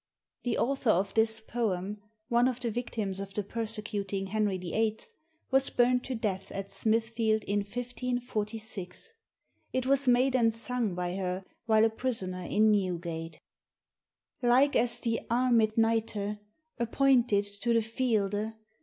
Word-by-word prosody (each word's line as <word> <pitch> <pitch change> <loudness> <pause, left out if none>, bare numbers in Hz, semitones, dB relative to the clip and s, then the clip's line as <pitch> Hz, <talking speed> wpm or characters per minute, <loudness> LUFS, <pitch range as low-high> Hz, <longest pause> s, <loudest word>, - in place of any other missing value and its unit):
[The 240 -2 -1
author 265 0 0
of 195 0 +2
this 220 0 +3
poem, 210 -3 -2 0.3
one 240 0 +3
of 255 -1 -2
the 240 -2 -2
victims 215 -4 -3
of 195 0 -6
the 210 - 0
per 230 +3 -3
secuting 205 -3 -3
Henry 210 -2 +1
VIII., 215 +5 -1 0.5
was 270 0 +3
burnt 250 0 +3
to 260 - -3
death 200 -4 -3
at 195 0 -5
Smithfield 225 +1 +1
in 205 +1 0
1546. 225 - -4 0.6
It 255 -1 -1
was 275 0 +2
made 250 +2 +4
and 230 -3 +4
sung 230 -3 -2
by 180 +1 -2
her 185 0 -3 0.2
while 220 -1 +5
a - - +4
prisoner 220 -7 -2
in 215 +4 +3
Newgate.] 170 -5 -2 1.0
Like 255 +4 +4
as 235 0 +2
the 230 -2 0
armed 235 -3 +3
Knighte, 225 -2 0 0.4
Appointed 240 -3 +3 0.2
to 235 - +1
the 230 -1 +3
fielde. 220 -2 0
220 Hz, 140 wpm, -30 LUFS, 200-240 Hz, 1.0 s, while